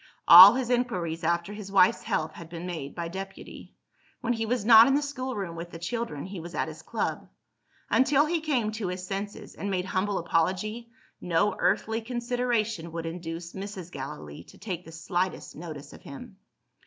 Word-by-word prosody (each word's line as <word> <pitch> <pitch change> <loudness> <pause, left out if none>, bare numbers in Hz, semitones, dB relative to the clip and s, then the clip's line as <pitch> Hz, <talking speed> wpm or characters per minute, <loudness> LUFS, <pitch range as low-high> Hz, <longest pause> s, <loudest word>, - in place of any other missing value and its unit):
All 185 +6 +12
his 250 -2 -2
inquiries 180 -10 -1
after 170 +4 0
his 205 -2 -8
wife's 195 -2 +4
health 155 0 -1
had 165 +1 -11
been 170 0 -7
made 160 -6 -6
by 170 -1 -3
deputy. 195 +2 -9 0.5
When 245 -1 0
he 225 -1 -2
was 240 -2 -1
not 225 0 +9
in 270 - +3
the 290 - +2
schoolroom 255 -11 -4
with 170 +1 -7
the 170 - -9
children, 170 -4 -4
he 190 -1 -7
was 170 +1 -8
at - - -1
his - - -9
club. - - -3 0.6
Until 275 +2 +3
he 325 +1 -1
came 255 -9 0
to 215 -3 -4
his 180 0 -4
senses, 200 +2 -6
and 200 - -5
made 185 -2 -1
humble 190 +1 -1
apology, 190 +8 -1 0.3
no 175 +4 +1
earthly 225 +1 +1
consideration 235 -6 -2
would 165 -1 -4
induce 165 0 -6
Mrs. 190 -3 -7
Gallilee 85 - -8
to - - -16
take 180 -4 -6
the 165 - -11
slightest 175 +3 -3
notice 155 -4 -9
of - - -13
him. 195 - -11
190 Hz, 180 wpm, -27 LUFS, 170-230 Hz, 0.6 s, All